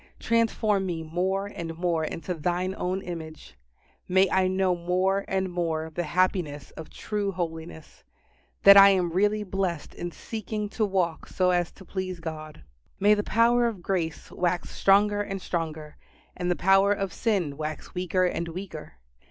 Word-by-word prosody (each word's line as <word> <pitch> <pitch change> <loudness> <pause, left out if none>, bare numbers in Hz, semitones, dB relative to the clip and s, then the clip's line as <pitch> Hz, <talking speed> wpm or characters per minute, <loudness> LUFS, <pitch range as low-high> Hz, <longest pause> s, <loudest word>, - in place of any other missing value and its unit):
Transform 220 -4 +1
me 165 -2 -3
more 185 +5 -1
and 170 -5 -6
more 170 -2 0
into 165 +3 -4
Thine 180 +3 -1
own 185 +2 -2
image. 160 - -8 0.5
May 190 +1 +4
I 190 0 +3
know 185 -1 +1
more 185 +3 0
and 190 -1 -1
more 160 -2 -2
the 175 - -2
happiness 165 -4 0
of 160 - -10
true 205 -2 -3
holiness 165 -3 -6 0.6
that 200 0 +10
I 200 0 +10
am 180 -3 +2
really 205 +4 +1
blessed 185 -5 -3
in 175 - -5
seeking 215 +1 -5
to 215 +1 0
walk 180 -4 -1
so 185 -1 +1
as 175 -1 +1
to 190 - -15
please 185 -1 -4
God. 155 -2 -7 0.4
May 205 +2 +5
the 210 - +1
power 235 +3 +3
of 205 -7 -5
grace 165 -5 -2
wax 175 -1 -1
stronger 205 +1 +3
and 195 -1 -4
stronger, 160 -4 -4 0.4
and 180 0 -2
the 180 - +2
power 195 +2 +4
of 195 -2 -1
sin 190 -11 0
wax 155 +1 -6
weaker 185 0 +1
and 170 -1 -2
weaker. 165 -2 -7
185 Hz, 160 wpm, -26 LUFS, 165-195 Hz, 0.6 s, that